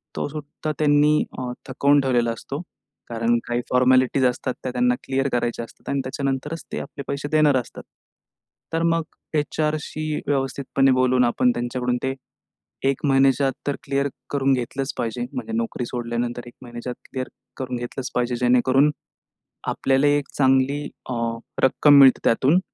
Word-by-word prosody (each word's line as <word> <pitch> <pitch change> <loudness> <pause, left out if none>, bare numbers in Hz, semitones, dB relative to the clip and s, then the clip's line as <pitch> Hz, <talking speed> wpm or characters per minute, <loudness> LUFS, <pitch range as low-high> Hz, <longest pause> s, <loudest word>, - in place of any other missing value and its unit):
तो - - -2
सुद्धा 150 +1 -5
त्यांनी 150 0 +4 0.2
अ, 125 -1 -3 0.2
थकवून 140 +2 +3
ठेवलेला 120 -3 +1
असतो. 135 +6 -6 0.5
कारण 115 0 +1
काही 120 0 0
फॉर्मॅलिटीज 130 +1 +4
असतात. 125 +1 0
त्या 130 - -2
त्यांना 125 0 +2
क्लिअर 135 +1 0
करायच्या 120 -1 -1
असतात - - -14
आणि 140 - 0
त्याच्यानंतरच 135 +4 -3
ते - - -3
आपले 140 - -7
पैसे 140 +1 -3
देणार 155 -2 +4
असतात. 125 - -6 0.9
तर 165 0 +1
मग 165 0 +2 0.3
एच-आरशी 155 +1 -2 0.2
व्यवस्थितपणे 135 -1 +1
बोलून 130 0 +3
आपण 125 +1 +2
त्यांच्याकडून 125 +1 -1
ते 130 0 0 0.8
1 135 +2 -2
महिन्याच्या 135 0 +4
आत 135 - -1
तर 145 - +1
क्लिअर 140 0 0 0.2
करून 135 -1 +2
घेतलंच 130 +2 -2
पाहिजे, 115 - -2
म्हणजे 250 -3 -5
नोकरी 230 - -2
सोडल्यानंतर 120 0 -3
1 120 - -11
महिन्याच्या 120 0 -6
आत - - -12
क्लिअर 130 -1 -3 0.3
करून 125 -1 -3
घेतलंच 120 +2 -5
पाहिजे. 125 0 0
जेणेकरून 130 +4 +4 0.8
आपल्याला 135 +2 +2
1 145 -1 +1
चांगली 135 +1 +3 0.3
अ, - - -1 0.5
रक्कम 140 +2 +6
मिळते 135 -2 +7
त्यातून 135 +9 +4
130 Hz, 150 wpm, -23 LUFS, 125-145 Hz, 0.9 s, मिळते